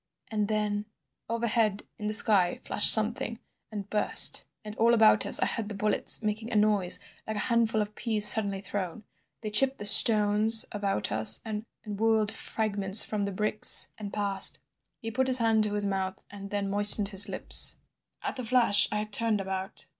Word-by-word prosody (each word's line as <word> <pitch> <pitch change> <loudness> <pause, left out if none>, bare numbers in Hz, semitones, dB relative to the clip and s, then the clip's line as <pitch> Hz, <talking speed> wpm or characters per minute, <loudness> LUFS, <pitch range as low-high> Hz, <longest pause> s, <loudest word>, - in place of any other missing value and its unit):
"And 210 -2 -4
then— 210 -1 -5 0.4
"Overhead 230 -3 -3 0.2
in 210 - -7
the 215 - -3
sky 195 -5 +1
flashed - - +4
something 230 +2 0 0.3
and 205 -2 -9
burst, 210 +1 +2 0.2
and 210 0 -10
all 235 +1 +1
about 220 -1 +1
us - - +6
I - - -1
heard 220 -2 -4
the 210 - -8
bullets 210 +2 +1
making 215 +2 -6
a - - -6
noise 210 -4 +2 0.3
like 220 - -6
a - - -5
handful 225 -2 -1
of 210 0 -13
peas 215 -2 -2
suddenly 200 -2 +3
thrown. 195 0 -8 0.4
They 215 -2 -8
chipped 270 +5 -1
the 205 - -9
stones 215 +1 +4
about 200 - -5
us, 110 +1 +2
and 215 0 -8 0.2
whirled 215 0 -2
fragments 205 -2 +1
from 210 -2 -5
the 200 - -6
bricks 210 +2 +3
and 205 -2 -10
passed... 200 -2 0 0.2
." - - -55
He 225 - -7
put 260 +3 -3
his 255 -1 +4
hand 225 -2 0
to 210 0 -5
his 205 -1 -2
mouth, 190 -1 -6
and 200 -1 -12
then 205 -1 -5
moistened 205 0 +3
his 200 0 +5
lips. - - +2 0.5
"At - - -7
the 255 - -7
flash 225 -4 +1
I - - -5
had 210 0 -8
turned 225 -2 -1
about 190 +1 -7
210 Hz, 185 wpm, -25 LUFS, 200-220 Hz, 0.5 s, us